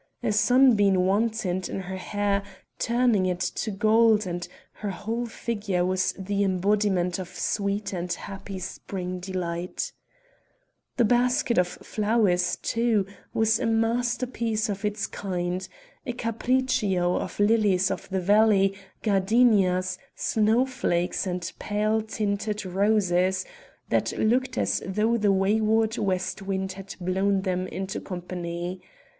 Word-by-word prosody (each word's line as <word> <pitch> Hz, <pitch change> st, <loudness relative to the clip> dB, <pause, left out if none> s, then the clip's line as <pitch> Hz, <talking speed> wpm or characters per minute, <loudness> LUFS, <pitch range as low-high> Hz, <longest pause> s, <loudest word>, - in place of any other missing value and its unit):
A 230 Hz, -, +1 dB
sunbeam 215 Hz, -3 st, +5 dB
wantoned 190 Hz, 0 st, 0 dB
in 195 Hz, -, -3 dB
her 190 Hz, 0 st, -6 dB
hair 200 Hz, +1 st, -1 dB, 0.4 s
turning 235 Hz, -5 st, +2 dB
it 180 Hz, -1 st, -1 dB
to 215 Hz, -, -2 dB
gold 215 Hz, +1 st, +4 dB
and 175 Hz, -1 st, -4 dB, 0.3 s
her 210 Hz, -, -2 dB
whole 225 Hz, +5 st, -3 dB
figure 205 Hz, -6 st, -2 dB
was 185 Hz, 0 st, +1 dB
the 200 Hz, +1 st, -1 dB
embodiment 190 Hz, -1 st, +1 dB
of 185 Hz, -, -5 dB
sweet 200 Hz, +2 st, -2 dB
and 175 Hz, -1 st, -3 dB
happy 195 Hz, +2 st, -6 dB
spring 185 Hz, 0 st, -5 dB
delight 180 Hz, -, -4 dB, 1.0 s
The 240 Hz, -, +4 dB
basket 245 Hz, -1 st, +2 dB
of 180 Hz, -, +3 dB
flowers, 205 Hz, -2 st, +1 dB
too, 230 Hz, -4 st, +1 dB, 0.3 s
was 220 Hz, 0 st, +3 dB
a 245 Hz, -, 0 dB
masterpiece 230 Hz, 0 st, 0 dB
of 200 Hz, 0 st, -4 dB
its 210 Hz, 0 st, -1 dB
kind 180 Hz, -1 st, -3 dB, 0.4 s
a 245 Hz, -, -3 dB
capriccio 230 Hz, -6 st, +1 dB
of -, -, -5 dB
lilies 205 Hz, -3 st, +3 dB
of -, -, -5 dB
the 190 Hz, -1 st, -1 dB
valley, 200 Hz, 0 st, +4 dB, 0.3 s
gardenias, 195 Hz, -3 st, +3 dB, 0.2 s
snow 220 Hz, +3 st, +2 dB
flakes, 180 Hz, -9 st, -1 dB
and 180 Hz, -1 st, -3 dB
pale 215 Hz, +1 st, 0 dB
tinted 210 Hz, -1 st, -2 dB
roses, 190 Hz, -1 st, +2 dB, 0.4 s
that -, -, 0 dB
looked 255 Hz, +4 st, +1 dB
as -, -, +1 dB
though 215 Hz, +4 st, +1 dB
the 210 Hz, -2 st, +3 dB
wayward 215 Hz, +3 st, +2 dB
west 185 Hz, -1 st, -1 dB
wind 190 Hz, -1 st, -2 dB
had 195 Hz, +1 st, -9 dB
blown 190 Hz, +2 st, +1 dB
them 185 Hz, -1 st, -1 dB
into 190 Hz, +1 st, -4 dB
company. 175 Hz, -1 st, -5 dB
200 Hz, 125 wpm, -26 LUFS, 185-220 Hz, 1.0 s, sunbeam